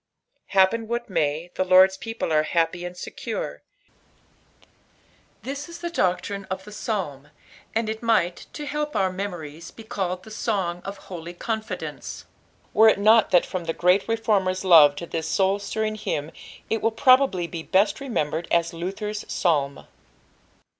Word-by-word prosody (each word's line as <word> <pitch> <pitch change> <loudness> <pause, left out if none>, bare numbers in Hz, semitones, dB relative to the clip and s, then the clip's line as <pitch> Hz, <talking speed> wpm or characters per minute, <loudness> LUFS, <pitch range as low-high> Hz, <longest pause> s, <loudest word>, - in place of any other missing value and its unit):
— - - -48
Happen 220 +4 +4
what 235 -2 -3
may, 160 0 -1
the - - 0
Lord" 185 +1 +7
a - - -16
people 225 -7 -3
art 155 0 +3
happy 170 +1 0
and 180 0 -7
secure, - - -5 1.8
this 280 +4 -5
is 340 - -8
the 345 0 -5
doctrine 195 - -1
qfthe 190 0 -4
PsalTn. 190 - -4 0.5
and 225 0 +1
it 220 0 -4
might, 215 -7 +1
to 300 - -6
Aefp 295 +1 -3
our 190 -1 +2
metTiories, 170 -5 -6
be 225 - -10
eddied 185 -4 -3
Tbe 220 - -12
Sono 190 -6 -2
or 195 - -4
Eolx 175 -3 -9
Confuishce, 220 0 -5 0.5
were 220 0 +7
U - - +4
7V)t 215 +2 +5
that 175 - +4
from 175 -3 -5
Iht 165 - -2
great 180 +3 +3
reformer's 210 -5 +1
tooe 165 -6 +8
to 170 - -6
this 165 -1 -4
soul 190 +5 +2
stirriiig 215 +1 -3
hymnit 150 +2 -3 0.5
wiUprt^iably 225 -5 +3
be 170 -2 -4
best 200 +5 +2
remembered 170 - -2
as 170 0 +2
Lcthbb'b 195 +5 -4
Fsiui. 145 -6 0
190 Hz, 155 wpm, -24 LUFS, 170-220 Hz, 1.8 s, tooe